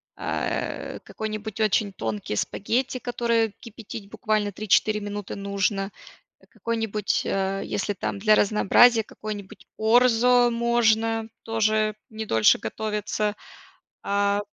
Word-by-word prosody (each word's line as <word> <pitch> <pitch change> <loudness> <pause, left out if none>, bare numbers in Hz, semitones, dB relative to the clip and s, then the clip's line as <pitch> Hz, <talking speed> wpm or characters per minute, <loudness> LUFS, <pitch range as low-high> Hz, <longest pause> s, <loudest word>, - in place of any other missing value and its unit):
а, - - -3
э, - - -8
какой-нибудь 215 -1 -6
очень 215 -1 +2
тонкий 110 - -4
спагетти, 245 - -1
которые 235 -3 0
кипятить 220 -2 -9
буквально 215 -2 -1
3-4 210 +1 +2
минуты 205 -1 -5
нужно, 200 0 -1 0.6
какой-нибудь, 225 -3 -2
а, 195 0 -1
если 205 +1 -2
там 200 - -4
для 215 +1 +5
разнообразия, 225 +3 +5
какой-нибудь 205 -3 -8
орзо 245 +2 +4
можно 225 -1 +1
тоже 215 -1 +1
не 220 0 -6
дольше 110 - +4
готовится. 210 - -2 0.7
А 200 0 +1
215 Hz, 105 wpm, -25 LUFS, 200-225 Hz, 0.7 s, для